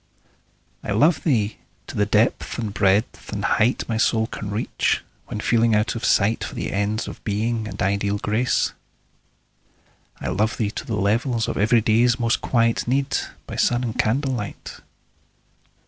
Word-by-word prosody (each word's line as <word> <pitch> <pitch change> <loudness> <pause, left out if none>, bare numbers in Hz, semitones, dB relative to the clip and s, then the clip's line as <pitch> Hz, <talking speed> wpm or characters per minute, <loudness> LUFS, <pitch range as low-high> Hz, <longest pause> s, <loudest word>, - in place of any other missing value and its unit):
I 105 - -2
love 150 - +3
thee 110 -9 +1 0.3
to - - -9
the 105 -1 +1
depth 110 +4 +1
and 110 -4 -3
breadth 100 +3 +1
and - - -3
height 115 +4 +2
My 115 - -1
soul 110 0 +2
can 105 -2 -6
reach, 105 +3 0 0.3
when - - -5
feeling 115 0 +3
out 105 +1 +1
of 115 - -6
sight 105 +3 +2
For - - -6
the - - -3
ends 105 +3 -1
of - - -9
Being 110 +1 -1
and - - -8
ideal 100 +1 0
Grace. 110 +5 0 1.5
I - - -3
love 110 +3 0
thee 105 -3 -1
to - - -6
the 115 - -1
level 110 +6 +1
of 115 -1 -1
everyday's 115 +2 +3
Most 115 -1 +1
quiet 115 -2 +1
need, 135 +2 +1 0.3
by - - -7
sun 120 +1 +2
and 115 -3 -3
candlelight. 125 -2 -2
110 Hz, 160 wpm, -23 LUFS, 105-120 Hz, 1.5 s, love